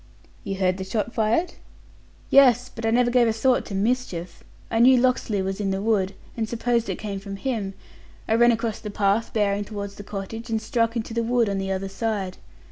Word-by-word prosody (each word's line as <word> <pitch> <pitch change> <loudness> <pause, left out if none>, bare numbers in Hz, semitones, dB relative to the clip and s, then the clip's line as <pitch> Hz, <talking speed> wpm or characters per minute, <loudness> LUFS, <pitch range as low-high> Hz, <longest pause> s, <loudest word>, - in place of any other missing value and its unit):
"You 195 -1 -3
heard 185 -1 +1
the 190 - -4
shot 215 +4 -2
fired?" 230 +11 +1 0.8
"Yes; 255 -2 +5
but 225 -1 -3
I - - +3
never 240 +1 +3
gave 245 -1 +4
a - - +3
thought 245 +3 +1
to 200 - -5
mischief. 195 -5 -2 0.3
I 225 - +1
knew 255 +2 +7
Locksley 240 -5 +1
was 195 +2 -3
in 195 - 0
the 190 0 -1
wood, 200 -2 0 0.2
and 220 -2 -2
supposed 235 0 0
it - - -2
came 200 -2 -5
from 195 0 -7
him. 205 -4 -3 0.5
I - - +1
ran 240 +1 +6
across 225 -1 -2
the 210 - -6
path, 205 +2 +1
bearing 205 -1 +1
toward 200 -1 -6
the 205 - -10
cottage, 210 +4 -6
and 225 -1 0
struck 230 0 0
into 225 -1 -3
the 235 - 0
wood 235 0 +2
on 200 -1 -1
the 195 0 -2
other 190 0 -2
side. 195 -2 -3
220 Hz, 210 wpm, -24 LUFS, 195-235 Hz, 0.8 s, knew